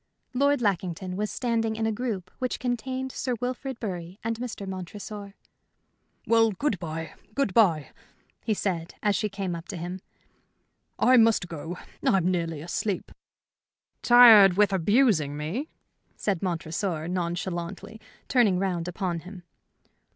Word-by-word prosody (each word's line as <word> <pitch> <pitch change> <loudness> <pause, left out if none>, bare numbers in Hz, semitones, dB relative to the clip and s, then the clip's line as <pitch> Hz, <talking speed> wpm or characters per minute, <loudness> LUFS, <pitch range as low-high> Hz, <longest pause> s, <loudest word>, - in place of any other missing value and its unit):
Lord 280 0 +2
Lackington 185 -2 -1
was 210 +2 -2
standing 225 -3 -1
in 220 0 -1
a 220 - +1
group 215 -5 -4
which 255 -1 -1
contained 260 +2 -2
Sir 250 -1 -2
Wilfrid 255 +1 -4
Bury 180 -2 -5
and 230 0 -2
Mr. 235 -5 -5
Montresor. 200 +2 -7 0.9
"Well, 225 -1 +4
good 215 - -1
bye, 160 -1 -5 0.2
good 275 -9 0
bye," 170 -10 +3 0.5
he 220 - 0
said, 170 -5 -3
as 205 -1 +3
she 210 - 0
came 195 -2 -3
up 170 +1 -7
to - - -6
him. 175 +2 -5 1.0
"I 255 0 +5
must 225 -5 +4
go. 165 +1 -6 0.3
I'm 185 -2 +3
nearly 165 -4 -2
asleep." 180 +4 -3 0.9
"Tired 225 -6 +8
with 205 -1 +4
abusing 190 - +3
me?" 185 - -3 0.5
said 195 -5 -1
Montresor, 165 -1 -2
nonchalantly, 180 +4 -4 0.3
turning 230 -8 +3
round 180 -3 -1
upon 180 -1 -2
him. 180 +1 -11
195 Hz, 135 wpm, -27 LUFS, 175-225 Hz, 1.0 s, Tired